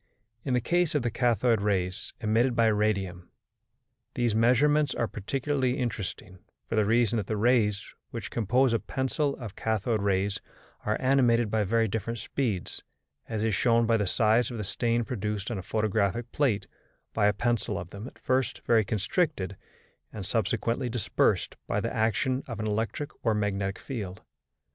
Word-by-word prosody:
In 130 -3 0
the 125 - +2
case 175 +3 +1
of 145 - +2
the 120 - 0
cathode 120 -1 +2
rays 95 -1 -1
emitted 115 +3 +2
by 115 - +4
radium, 100 -5 0 0.9
these 120 -2 +1
measurements 145 +7 +3
are 120 - +1
particularly 130 +5 -1
interesting, 100 -6 -4 0.3
for - - -6
the 110 -1 +3
reason 115 +1 +3
that 100 -3 -2
the 110 - -1
rays 105 -3 +2 0.2
which - - -6
compose 120 +3 +2
a 115 - +2
pencil 140 +2 -1
of 115 -6 -8
cathode 110 0 0
rays 100 0 0 0.5
are 105 - +2
animated 120 -4 +3
by 110 -1 +2
very 115 +3 +2
different 110 +3 -3
speeds, 110 -4 -3 0.5
as 110 -2 -2
is 110 -1 +1
shown 115 +3 +3
by 115 0 +3
the 105 -2 0
size 110 +3 +3
of 120 - -6
the 105 - -3
stain 115 +4 0
produced 105 -2 -3
on 110 - -2
a - - -4
photographic 110 +3 0
plate 125 -9 +1 0.5
by 105 -2 +3
a - - +5
pencil 120 +1 -1
of 85 0 -7
them 100 +4 -7
at - - -13
first 130 0 -1
very 115 -2 +4
constricted 100 - -1 0.6
and 105 -3 -6
subsequently 115 +4 0
dispersed 120 -3 +1
by - - 0
the - - -3
action 125 +4 +1
of 115 -4 -6
an 110 - -2
electric 110 +7 -2
or 115 -2 +2
magnetic 100 -2 -1
field. 100 -8 -6
110 Hz, 165 wpm, -28 LUFS, 105-125 Hz, 0.9 s, a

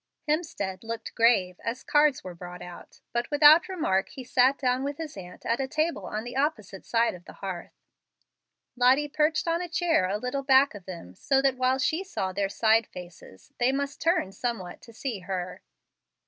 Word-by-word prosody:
Hemstead 295 - -2
looked 225 0 -6
grave, 200 -6 +3
as 235 +3 -4
cards 295 -2 +3
were 185 - -7
brought 180 +1 -9
out, 175 -1 -12
but 240 0 -1
without 305 +6 +7
remark 195 - 0
he 260 - -9
sat 255 +2 +3
down 255 -1 0
with 285 0 -3
his 320 -3 -6
aunt 180 -2 -11
at 230 - 0
a 270 - -1
table 310 - -1
on 215 +1 -4
the 245 +1 -7
opposite 240 -9 -2
side 230 0 +2
of 175 -1 -12
the - - -11
hearth. 185 -3 -8 0.9
Lottie 260 +4 +4
perched 305 +2 +1
on 335 +1 +1
a 355 - -5
chair 330 - +1
a 200 - 0
little 250 +5 -3
back 270 0 +4
of 200 -4 -11
them, 170 - -9
so 270 - +1
that 270 -2 +3
while 255 +1 +2
she 310 +8 0
saw 190 - -3
their 195 0 -1
side 220 +2 +3
faces 175 - -13
they 245 +1 +3
must 280 +1 -3
turn 330 - +1
somewhat 195 -4 -4
to 230 - -14
see 230 -2 -4
her. 180 -1 -5
245 Hz, 190 wpm, -27 LUFS, 190-285 Hz, 0.9 s, without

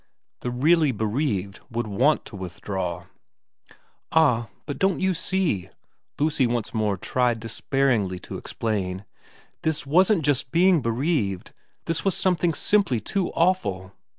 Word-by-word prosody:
The 125 - -3
really 150 +4 +3
bereaved 105 -3 -2
would 120 -1 -2
want 125 +9 +2
to - - -10
withdraw 90 -1 -4 0.5
' - - -27 0.3
Ah, 125 -8 +3 0.2
but 145 - -5
don't 190 -1 +2
you 190 0 +2
see,' 165 - -1 0.5
Lucy 145 -3 +2
once 120 -2 -2
more 105 -3 0
tried 120 +4 0
despairingly 115 -3 0
to - - -7
explain, 100 -4 -3 0.3
' - - -30
this 160 -2 -1
wasn't 175 +3 +3
just 140 -3 +1
being 175 -1 +4
bereaved 115 - -1 0.3
this 165 -1 -1
was 195 -3 +1
something 175 -3 +1
simply 195 - +2
too 185 - -2
awful. 100 - 0
125 Hz, 135 wpm, -24 LUFS, 105-165 Hz, 0.5 s, being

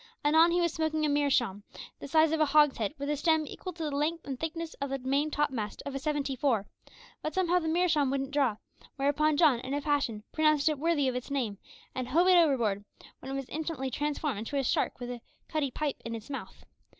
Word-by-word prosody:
Anon 320 +3 +6
he 345 +1 +2
was 340 -2 +1
smoking 315 -1 0
a - - +1
meerschaum 270 -8 +1 0.4
the - - -7
size 315 +2 +4
of 320 - 0
a 310 - +5
hogshead, 295 -6 +3
with 280 0 -4
a 295 - +1
stem 315 +1 +2
equal 370 +5 -7
to 330 -1 -6
the 300 - -2
length 315 +3 -1
and 270 -3 -5
thickness 325 0 -4
of 280 - -2
the 275 - -1
main 275 +4 0
topmast 265 -9 -2
of 280 - -4
a 275 - -3
seventy 285 -2 -1
four; 240 -6 +1 0.6
but 310 - -4
somehow 360 -1 +3
the 320 - -4
meerschaum 320 -4 +2
wouldn't 270 0 -2
draw, 270 -7 +1 0.4
whereupon 290 +2 +2
John, 295 -7 +5
in 265 +3 -4
a 290 - -1
passion, 275 -8 0
pronounced 305 -1 +3
it 300 -3 -2
worthy 310 -3 +2
of 255 - 0
its 250 +2 -5
name, 240 -8 -2 0.3
and 255 -1 -3
hove 335 +8 +3
it 365 - +7
overboard, 240 - +2 0.4
when 265 - -7
it - - -3
was 275 -2 -4
instantly 305 -4 -3
transformed 295 -3 -2
into 230 +6 -4
a 275 - +1
shark - - 0
with 245 0 -5
a 240 -1 -7 0.3
cutty 305 -3 -1
pipe 290 +2 -2
in 230 0 -4
its 225 +4 -9
mouth. 275 - -7
290 Hz, 225 wpm, -30 LUFS, 265-315 Hz, 0.6 s, it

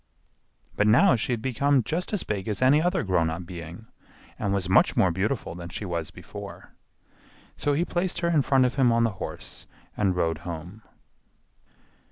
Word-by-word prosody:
But 105 - +2
now 130 - +6
she 115 +2 -2
had 115 -2 -2
become 135 +1 +2
just 165 +8 -3
as 210 -4 -1
big 100 -3 -3
as 105 -2 -1
any 140 +4 +5
other 180 +2 +1
grown 90 -4 +1
up 85 +2 -5
being 85 +3 -9 0.5
and 100 -2 -1
was 100 -2 0
much 95 - +4
more 95 - +4
beautiful 95 +2 -2
than 85 0 -8
she 100 - -5
was 85 -4 -3
before. - - -10 0.8
So 145 - 0
he 165 +5 +1
placed 175 0 -2
her 170 - +1
in 160 -4 +3
front 135 -1 +3
of 125 - 0
him 130 -3 +4
on 115 0 +3
the 115 - +2
horse - - -6 0.3
and 95 -3 +1
rode 80 -3 0
home. 85 +5 -7
105 Hz, 185 wpm, -26 LUFS, 90-140 Hz, 0.8 s, now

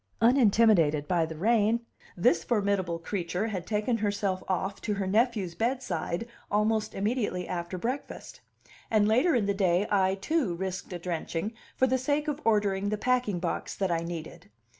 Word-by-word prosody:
Unintimidated 215 - +4
by 170 -2 +1
the 160 -1 -7
rain, 225 +4 +2 0.4
this 170 -1 +3
formidable 200 -6 0
creature 180 +2 -3
had 190 -6 -4
taken 215 +2 0
herself 200 -3 -1
off 190 +1 -2
to 210 -2 -1
her 195 -1 -2
nephew's 210 -3 +1
bedside 230 -4 -2 0.2
almost 215 +1 +1
immediately 205 -3 -1
after 175 0 -4
breakfast; 250 +9 -5 0.5
and 215 -2 +3
later 255 +9 +3
in 225 -4 +2
the 200 - +1
day 190 -1 +2
I, 190 -2 +3
too, 200 - 0
risked 185 +1 -4
a 180 - -3
drenching 170 +3 -3 0.2
for 260 - +4
the 260 0 +1
sake 290 +4 0
of 295 0 -2
ordering 205 -2 +2
the 210 - -1
packing 245 -4 +1
box 170 -1 -3
that 190 -3 -1
I 165 - +1
needed. 165 -7 -7
200 Hz, 160 wpm, -28 LUFS, 180-230 Hz, 0.5 s, Unintimidated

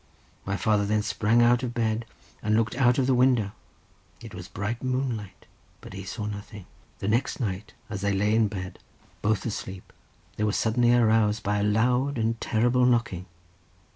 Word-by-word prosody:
My 100 0 -1
father 105 +2 +2
then 105 +1 +1
sprang 115 +2 +2
out 120 0 +4
of 125 -1 -4
bed, 115 -1 0 0.4
and 110 0 +1
looked 110 0 +1
out 125 -1 +3
of 135 - +2
the 130 - +3
window; 125 -5 +3 0.7
it - - -11
was - - -8
bright 110 +4 -4
moonlight, 125 -6 -3 0.3
but - - -11
he 95 0 -7
saw 105 +2 -5
nothing. 105 -1 -7 0.3
The - - -4
next 115 +7 0
night, 105 -4 -4
as 100 -3 -5
they 100 0 +1
lay 105 +2 +1
in 110 -1 +4
bed 95 -2 -6 0.4
both 105 0 0
asleep, 95 -4 -6 0.4
they 105 - -1
were 105 -1 +1
suddenly 120 +2 +2
aroused 110 -2 +3
by 105 +1 0
a - - 0
loud 125 +6 +2
and 115 0 -1
terrible 120 +2 +2
knocking. 115 -7 0
110 Hz, 175 wpm, -26 LUFS, 105-120 Hz, 0.7 s, out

